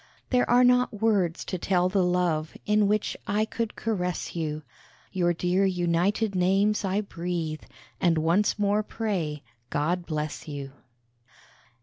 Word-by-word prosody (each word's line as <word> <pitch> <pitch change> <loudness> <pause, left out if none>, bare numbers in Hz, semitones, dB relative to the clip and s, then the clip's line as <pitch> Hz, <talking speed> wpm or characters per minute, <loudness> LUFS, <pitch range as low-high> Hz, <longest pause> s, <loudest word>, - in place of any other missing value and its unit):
There 250 -1 +2
are 245 +1 +6
not 250 -3 +3
words 200 -7 +1
to 185 - -4
tell 180 0 +2
the 190 0 +2
love 175 -3 0
In 210 -1 +3
which 210 +1 0
I 210 +2 +1
could 225 0 -4
caress 180 -7 -2
you; 155 -2 -3 0.5
Your 175 -2 +1
dear 180 +3 +1
united 185 +3 +1
names 195 +4 +2
I 195 +1 0
breathe, 170 -5 -4 0.4
And 170 -2 +3
once 170 +8 +2
more 205 0 +2
pray, 185 -10 -3 0.3
God 170 +4 -1
bless 155 -1 -4
you. 140 -2 -6
180 Hz, 135 wpm, -27 LUFS, 170-210 Hz, 0.5 s, are